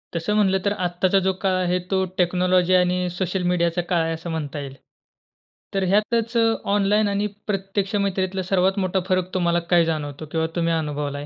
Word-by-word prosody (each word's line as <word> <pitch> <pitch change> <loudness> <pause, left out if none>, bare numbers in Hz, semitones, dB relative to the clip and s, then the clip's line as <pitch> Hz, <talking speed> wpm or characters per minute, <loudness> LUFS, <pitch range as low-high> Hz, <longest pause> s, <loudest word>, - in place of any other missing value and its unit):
तसं 170 +6 -1
म्हटलं 190 -2 +3
तर 200 - +2
आत्ताचा 180 +2 +2
जो 190 - +2
काळ 190 -2 +1
आहे 180 +1 +1
तो 190 -1 +2
टेक्नॉलॉजी 180 0 +2
आणि 180 0 +2
सोशल 185 0 -1
मीडियाचा 170 0 +1
काळ 175 -3 +2
आहे 165 0 -1
असं 165 +2 -6
म्हणता 150 -2 -4
येईल. 135 -1 -7 1.0
तर 195 -1 0
ह्यातच 225 +4 +1 0.4
ऑनलाईन 205 +1 +2
आणि 200 +1 0 0.2
प्रत्यक्ष 195 0 -2
मैत्रीतला 190 -1 -1
सर्वात 190 +1 +1
मोठा 190 0 0
फरक 185 0 0
तुम्हाला 175 -2 +1
काय 170 -1 +5
जाणवतो? 155 -2 -3
किंवा 160 +1 -1
तुम्ही 170 -1 +1
अनुभवलाय? 145 -2 -3
180 Hz, 170 wpm, -23 LUFS, 170-195 Hz, 1.0 s, काय